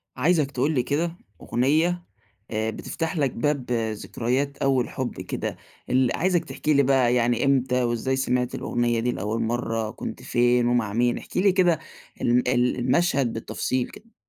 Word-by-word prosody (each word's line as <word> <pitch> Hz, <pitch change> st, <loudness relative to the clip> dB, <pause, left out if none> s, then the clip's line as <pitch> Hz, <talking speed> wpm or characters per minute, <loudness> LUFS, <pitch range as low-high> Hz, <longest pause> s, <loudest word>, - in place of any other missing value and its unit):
عايزك 150 Hz, +1 st, +2 dB
تقُول 140 Hz, +3 st, 0 dB
لي 130 Hz, -5 st, +1 dB
كده 165 Hz, +6 st, -1 dB, 0.3 s
أغنية 160 Hz, +8 st, +1 dB, 0.5 s
آآ، 110 Hz, 0 st, -1 dB
بتفتَح 165 Hz, -, -4 dB
لَك 140 Hz, -4 st, +1 dB
باب 135 Hz, 0 st, -1 dB
ذكريات 120 Hz, +4 st, -1 dB
أول 135 Hz, -3 st, +1 dB
حُب 130 Hz, -1 st, -4 dB
كده -, -, -4 dB, 0.3 s
ال 130 Hz, -1 st, +2 dB
عايزك 175 Hz, -2 st, +1 dB
تحكِي 155 Hz, -1 st, -1 dB
لي 140 Hz, -1 st, +4 dB
بقى 130 Hz, -2 st, +3 dB
يعني 120 Hz, +1 st, +2 dB
إمتى 130 Hz, -2 st, +2 dB
وإزاي 120 Hz, +2 st, 0 dB
سمِعت 125 Hz, -2 st, 0 dB
الأغنية 120 Hz, -1 st, 0 dB
دي 120 Hz, +2 st, 0 dB
لأول 110 Hz, +2 st, -2 dB
مرَّة، 115 Hz, -1 st, -1 dB
كنت -, -, -7 dB
فين 120 Hz, 0 st, +2 dB
ومع 120 Hz, -4 st, +1 dB
مين، 120 Hz, +2 st, +2 dB
احكِ -, -, -8 dB
لي 195 Hz, +2 st, +5 dB
كده 180 Hz, -4 st, +3 dB, 0.4 s
ال 120 Hz, +1 st, +2 dB
ال 125 Hz, 0 st, +2 dB
المشهد 130 Hz, -1 st, +2 dB
بالتفصيل 125 Hz, +2 st, -2 dB
كده. 230 Hz, +2 st, -15 dB
125 Hz, 160 wpm, -25 LUFS, 120-145 Hz, 0.5 s, لي